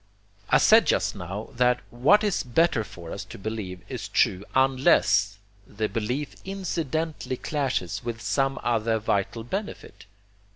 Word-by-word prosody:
I - - +6
said - - +6
just - - +1
now 95 +5 -6
that 125 0 +3
what 140 - +4
is 205 -4 +1
better 130 -1 +2
for 85 -5 -10
us - - -5
to - - -10
believe 100 -3 -5
is - - -5
true 95 +2 +2
UNLESS 130 - +3 0.3
THE 110 +1 -3
BELIEF 125 +6 -3
INCIDENTALLY 165 -7 -3
CLASHES 135 - -2
WITH 115 -1 -4
SOME 135 +2 0
OTHER 115 -1 +1
VITAL 110 +1 -1
BENEFIT. 195 - -6
120 Hz, 135 wpm, -26 LUFS, 105-145 Hz, 0.3 s, I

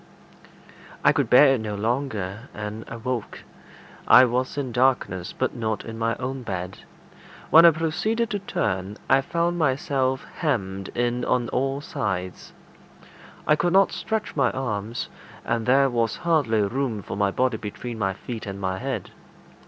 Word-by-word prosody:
I - - +6
could - - 0
bear 135 +2 +7
it 125 - -1
no 105 -1 -4
longer, 110 -1 -2
and 105 +1 -6
awoke. 115 -1 -5 0.6
I 130 - +9
was 125 +3 -1
in 135 -3 -2
darkness, 120 -8 +1
but 130 - -2
not 110 -3 -2
in 115 0 -7
my 115 0 0
own 130 +1 -4
bed. 95 -5 -5 0.7
When 165 +2 +9
I - - +10
proceeded 175 +9 -1
to 205 - -1
turn, 95 - -2
I 135 - +5
found 170 +3 -1
myself 135 -2 0
hemmed 100 - -1
in 120 0 0
on 120 -2 +1
all 135 +2 -1
sides. 95 - -4 0.9
I 150 - +4
could 170 +4 0
not 195 0 +5
stretch 220 -1 -3
my 135 -4 +3
arms, 115 -3 -3 0.4
and 115 0 -1
there 135 +2 +5
was 115 -3 0
hardly 150 -11 +1
room 115 -1 -2
for - - -6
my 100 0 +2
body 125 +3 0
between 110 +3 -6
my 95 -2 0
feet 110 +3 -7
and 100 0 -5
my 95 -1 -2
head. - - -4
120 Hz, 155 wpm, -24 LUFS, 105-135 Hz, 0.9 s, I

